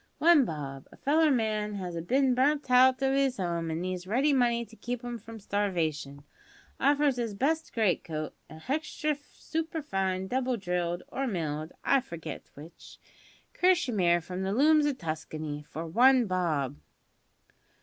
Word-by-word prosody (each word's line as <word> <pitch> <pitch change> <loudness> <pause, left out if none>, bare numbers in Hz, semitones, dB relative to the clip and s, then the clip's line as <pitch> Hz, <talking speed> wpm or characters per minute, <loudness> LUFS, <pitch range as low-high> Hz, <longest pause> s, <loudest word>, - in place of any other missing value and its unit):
One 325 -5 +6
bob! 140 - -6
A - - -15
feller 310 +3 +3
man 215 -5 0
as 180 -3 -5
has 165 -1 -4
bin 265 +4 +3
burnt 285 +3 +2
hout 255 +1 +5
of 270 0 +2
'is 270 -3 +1
'ome 170 -2 -2
an' 160 +1 -2
needs 185 0 -4
ready 265 +8 +2
money 240 -2 +2
to 225 - -16
keep 245 +1 -5
'im 240 -1 -5
from 225 +1 -10
starvation, 160 -9 -2 0.6
offers 285 -1 +3
his 230 -4 -2
best 315 +8 0
great 215 -6 +1
coat 155 -2 -5 0.2
a 155 - -10
hextra 300 - -2 0.2
superfine, 285 - -2
double 255 +1 0
drilled 175 -2 -2
(or 270 0 -2
milled, 155 -6 -3
I 275 - +4
forget 165 - -8
w'ich) 160 +4 -13 0.6
kershimere, 220 - +2
from 180 +2 -5
the 190 +1 -1
looms 300 +4 +4
o' 290 - +1
Tuskany 155 -4 -5
for 160 +2 -6
one 250 +8 +5
bob!" 155 - -1
215 Hz, 155 wpm, -29 LUFS, 170-265 Hz, 0.6 s, One